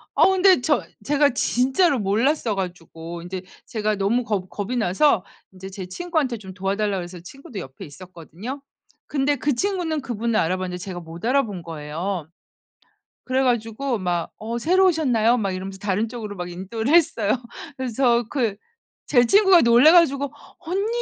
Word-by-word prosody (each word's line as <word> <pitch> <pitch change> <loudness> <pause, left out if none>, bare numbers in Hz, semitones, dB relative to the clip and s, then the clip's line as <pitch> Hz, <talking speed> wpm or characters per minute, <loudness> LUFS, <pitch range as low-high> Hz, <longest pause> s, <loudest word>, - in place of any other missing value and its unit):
아 - - +6
근데 380 -4 +5
저 295 +4 +1 0.2
제가 290 0 +3
진짜로 265 +4 +2
몰랐어 225 +4 +1
가지고 170 -2 -6
인제 180 +1 -6 0.2
제가 215 -3 -1
너무 205 +6 +1
겁 200 -5 -2
겁이 205 +5 -4
나서 215 +1 +2 0.3
이제 190 +1 -9
제 190 -1 -7
친구한테 305 - -2
좀 190 -3 -10
도와 195 +2 -2
달라고 205 -2 -1
그래서 175 0 -8
친구도 215 +4 -10
옆에 130 0 -9
있었거든요. 185 - -9 0.4
근데 285 0 0
그 285 +2 0
친구는 350 -2 -1
그분을 235 -3 -1
알아봤는데 180 +1 -1
제가 180 -1 -6
못 165 +1 -11
알아본 230 -7 0
거예요. 165 +2 -5 1.0
그래 260 +1 0
가지고 240 +1 0
막 175 -3 -2
"어 230 +2 -4
새로 370 +7 +3
오셨나요?" 245 -8 +2
막 200 -4 -1
이러면서 190 +1 -6
다른 205 +2 0
쪽으로 220 -3 -7
막 175 0 -5
인도를 220 - -3
했어요. 235 -11 +3 0.5
그래서 245 -1 +1
저 - - -20
그 235 -8 0 0.5
제 245 -4 +5
친구가 385 - +6
놀라 240 +7 +6
가지고 285 -5 +3 0.3
"언니, 375 +5 -2
225 Hz, 345 characters per minute, -23 LUFS, 185-275 Hz, 1.0 s, 아